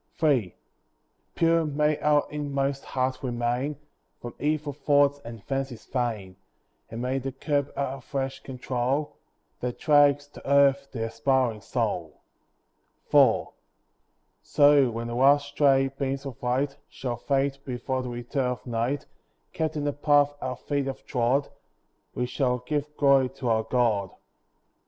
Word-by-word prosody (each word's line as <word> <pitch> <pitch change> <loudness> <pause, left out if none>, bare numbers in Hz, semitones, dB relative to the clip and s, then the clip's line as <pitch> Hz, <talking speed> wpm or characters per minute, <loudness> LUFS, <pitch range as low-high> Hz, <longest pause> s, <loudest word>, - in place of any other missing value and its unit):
III 125 - +2 0.8
Pure 165 -1 +3
may 150 0 +1
our 150 -1 +3
inmost 140 -2 -2
heart 130 0 -1
remain 125 +3 -1 0.4
From 120 - -8
evil 150 -1 -1
thoughts 145 0 +3
and 115 -3 -9
fancies 135 -3 -4
vain; 110 -7 -3 0.5
And 115 +2 -5
may 130 +2 0
the 135 +1 -4
curb 140 +1 -1
our 135 -1 -2
flesh 135 0 -4
control, 130 +2 -2 0.4
That 125 0 -3
drags 145 -2 +4
to 140 - -10
earth 140 0 +4
the 115 -3 -3
aspiring 125 -1 0
soul. - - -3 0.9
IV - - +5 0.9
So, 145 -3 +5
when 115 0 -4
the 120 - -4
last 140 +3 +4
stray 135 -2 +3
beams 135 0 -3
of 135 -4 -8
light 135 +3 -1
Shall 120 -3 -4
fade 140 +2 0
before 130 +1 -3
the 125 - -5
return 120 +2 -2
of 125 - -5
night, 120 +4 -2 0.5
Kept 155 -1 -2
in 150 - -2
the 145 0 0
path 145 0 +3
our 130 0 -3
feet 140 -2 -2
have 135 - -6
trod, 125 +3 +1 0.7
We 125 - 0
shall 125 0 0
give 150 0 -3
glory 140 -2 +4
to 125 -3 -2
our 110 -1 +2
God. 110 -6 +1
135 Hz, 140 wpm, -26 LUFS, 125-145 Hz, 0.9 s, IV